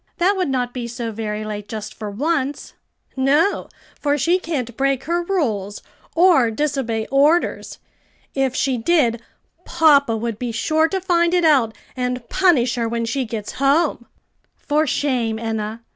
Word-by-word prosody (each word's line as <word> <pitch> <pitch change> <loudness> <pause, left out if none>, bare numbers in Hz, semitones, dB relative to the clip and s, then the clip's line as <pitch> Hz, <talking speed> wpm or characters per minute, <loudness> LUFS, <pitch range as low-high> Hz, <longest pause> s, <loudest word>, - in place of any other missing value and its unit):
that 380 +3 +2
would 370 -6 -1
not 250 -2 -1
be 245 -2 -4
so 235 -1 -5
very 215 -1 -4
late 210 -1 -6
just 215 -1 -6
for 215 -2 -6
once." 280 +5 -2 0.4
"No, 285 +9 +2 0.3
for 290 -1 +1
she 340 +7 +2
can't 260 -10 -4
break 270 0 0
her 340 +3 0
rules, 225 - -2 0.3
or 330 -9 +5
disobey 235 -3 -2
orders. 295 +5 +2 0.6
If 265 -2 0
she 260 -2 0
did, 240 -5 +2 0.4
papa 280 -7 +3
would 230 -1 -4
be 245 -2 -3
sure 315 +8 +1
to 385 +3 -2
find 350 -1 +2
it 350 -2 +2
out 260 -8 +3 0.2
and 250 -1 -3
punish 315 -11 +3
her 235 -2 -1
when 230 0 -2
she 255 +3 -2
gets 220 -2 -5
home." 280 -3 +2 0.5
"For 305 +1 0
shame, 245 -5 0
Enna! 220 0 -4
260 Hz, 155 wpm, -20 LUFS, 230-315 Hz, 0.6 s, or